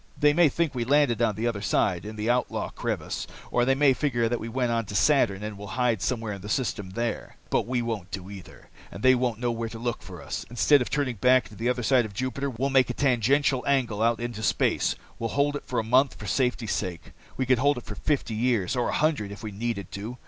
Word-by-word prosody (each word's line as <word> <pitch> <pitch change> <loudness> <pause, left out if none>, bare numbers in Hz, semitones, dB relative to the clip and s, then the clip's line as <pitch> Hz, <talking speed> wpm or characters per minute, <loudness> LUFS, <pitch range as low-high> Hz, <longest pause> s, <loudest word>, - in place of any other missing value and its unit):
They 145 0 +5
may 170 0 +5
think 165 +1 -1
we 125 -2 -1
landed 130 -3 +3
on 110 -3 +2
the 110 +3 -3
other 115 -4 -1
side, 95 -2 +1
in 110 - -7
the 105 +1 -3
Outlaw 125 +1 0
Crevice. - - -3 0.2
Or 120 0 +2
they 135 +1 +3
may 140 -1 +5
figure 120 -4 0
that 120 +1 -1
we 115 - -5
went 125 0 0
on 115 -1 0
to 105 - -7
Saturn, 105 -4 +3
and 105 -1 -6
will 105 - -7
hide 120 -5 +1
somewhere 115 -3 -2
in 100 - -8
the 105 - -8
system 105 -5 -1
there. 120 0 -3 0.2
"But - - +1
we 125 -1 0
won't 110 -6 -4
do 95 -2 -6
either, 95 -3 -12 0.2
and - - -9
they 130 0 +7
won't 125 -3 0
know 120 -1 0
where 115 -1 -3
to 115 - -8
look 120 0 -3
for - - -10
us. - - -4
Instead 130 +4 +4
of 125 - -2
turning 135 -5 -1
back 125 +3 +4
on 105 - -12
the 120 +2 0
other 125 -1 -1
side 125 0 +3
of 100 -2 -9
Jupiter, 130 +4 -2
we'll 135 +3 -2
make 130 -2 +4
a 125 - -3
tangential 130 +1 +2
angle 125 -7 +1
out 115 0 +2
into 120 -2 -4
space. 110 - +1 0.2
We'll 115 - -2
hold 145 +1 +2
it 145 - -6
for 125 - -3
a - - +1
month, 130 +4 +3
for 105 - -9
safety's 125 0 0
sake. 90 -5 -4 0.3
We 130 - 0
could 125 -1 +3
hold 140 -2 +2
for - - -7
fifty 135 0 -1
years, 115 -3 +1
or 125 - 0
a - - -2
hundred, 150 -10 0
if 100 - -9
we 110 - -5
needed 100 -2 -4
to. 110 +5 -6
120 Hz, 250 wpm, -26 LUFS, 110-130 Hz, 0.3 s, they